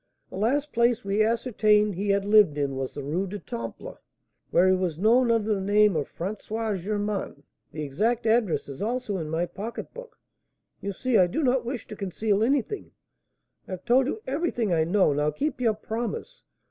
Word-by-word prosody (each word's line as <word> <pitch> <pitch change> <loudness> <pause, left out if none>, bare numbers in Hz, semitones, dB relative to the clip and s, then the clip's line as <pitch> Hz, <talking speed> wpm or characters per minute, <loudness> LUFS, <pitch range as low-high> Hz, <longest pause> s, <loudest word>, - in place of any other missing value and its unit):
The - - -8
last 275 +9 0
place 235 0 +2
we 200 +2 +1
ascertained 215 -2 +2
he 200 +3 -3
had 200 0 +2
lived 205 -8 +5
in 140 -2 -1
was 135 -1 -4
the 145 - -5
Rue 170 +8 -1
du 205 +3 -5
Temple, 115 - -7 0.5
where 180 +2 +4
he 185 - +5
was 180 -4 -2
known 235 +6 +4
under 220 -2 +2
the 195 - -2
name 205 0 +4
of 150 -3 -2
François 215 +3 -3
Germain; 205 -5 -3 0.3
the 155 0 -5
exact 220 - 0
address 220 -5 +2
is 140 -1 -8
also 225 -2 -2
in 160 -3 -4
my 165 +2 0
pocketbook. 230 - -8 0.6
You 200 - -3
see 250 +4 +1
I 180 - +5
do 300 - -2
not 255 -1 +2
wish 245 0 -4
to 215 - -9
conceal 200 +1 -1
anything, 275 - 0 0.8
I - - -6
have 185 - -7
told 255 +2 +4
you 435 +9 -4
everything 260 - -1
I 160 -1 +2
know. 180 -3 +3
Now 150 +1 +1
keep 265 - -3
your 225 -3 +2
promise. 230 - -5
210 Hz, 185 wpm, -26 LUFS, 180-235 Hz, 0.8 s, lived